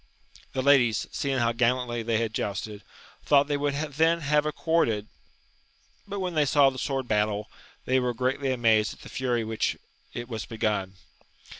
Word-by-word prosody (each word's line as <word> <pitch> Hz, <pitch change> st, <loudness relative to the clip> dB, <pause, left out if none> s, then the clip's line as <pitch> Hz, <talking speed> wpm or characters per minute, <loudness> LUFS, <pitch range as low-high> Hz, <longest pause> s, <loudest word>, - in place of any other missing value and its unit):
The 130 Hz, -, -1 dB
ladies, 125 Hz, -6 st, +4 dB
seeing 135 Hz, -1 st, -1 dB
how 115 Hz, -2 st, +2 dB
gallantly 120 Hz, 0 st, 0 dB
they 115 Hz, 0 st, 0 dB
had 115 Hz, -1 st, -1 dB
jousted, 105 Hz, 0 st, -4 dB, 0.4 s
thought 140 Hz, -1 st, +4 dB
they 145 Hz, 0 st, -1 dB
would 145 Hz, 0 st, -1 dB
then 160 Hz, +3 st, +1 dB
have 150 Hz, +1 st, +2 dB
accorded, 150 Hz, -10 st, +1 dB, 1.0 s
but 200 Hz, 0 st, -4 dB
when 180 Hz, -2 st, -2 dB
they 155 Hz, -2 st, +3 dB
saw 140 Hz, -1 st, +5 dB
the 130 Hz, -, -7 dB
sword 135 Hz, -1 st, -2 dB
battle, 105 Hz, -1 st, 0 dB, 0.3 s
they 130 Hz, +1 st, +2 dB
were 125 Hz, -1 st, -1 dB
greatly 130 Hz, +3 st, 0 dB
amazed 110 Hz, -4 st, +2 dB
at -, -, -19 dB
the -, -, -11 dB
fury 125 Hz, -3 st, -1 dB
with 110 Hz, -, -6 dB
which -, -, +1 dB, 0.4 s
it 120 Hz, 0 st, -5 dB
was 110 Hz, -3 st, -5 dB
begun. 105 Hz, -4 st, -2 dB
125 Hz, 170 wpm, -27 LUFS, 110-145 Hz, 1.0 s, saw